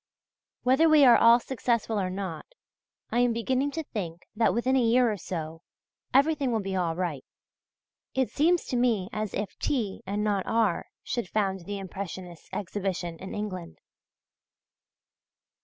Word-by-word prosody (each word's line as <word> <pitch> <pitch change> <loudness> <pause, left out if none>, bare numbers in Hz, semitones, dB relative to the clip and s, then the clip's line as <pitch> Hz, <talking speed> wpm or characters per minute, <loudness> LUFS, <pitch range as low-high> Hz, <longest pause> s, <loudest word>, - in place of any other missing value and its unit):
Whether 265 +6 +4
we 305 -3 +7
are 245 - +8
all 230 +1 +7
successful 235 -4 -1
or 185 -2 -1
not, 185 -4 -5 0.6
I 240 - +1
am 245 -1 +3
beginning 260 +4 0
to 320 - -3
think 175 - -5
that 225 +1 +3
within 250 +3 +1
a 260 - +4
year 240 0 +4
or 210 - -3
so, 165 -3 -5 0.5
everything 280 -1 +3
will 225 - +1
be 195 -2 -3
all 170 -3 0
right. 170 -6 -3 0.9
It 260 -1 +1
seems 340 +4 +2
to - - -1
me 230 -6 +1
as 215 -1 -3
if 205 0 -3
T. 225 -9 -1
and 205 +2 -1
not 205 -3 0
R. 225 -6 +1 0.2
should 235 -7 -3
found 195 -4 -1
the 205 +2 -4
Impressionists' 185 -3 -7
exhibition 185 -3 -3
in 190 - -7
England. 185 -5 -5
210 Hz, 155 wpm, -27 LUFS, 185-245 Hz, 0.9 s, are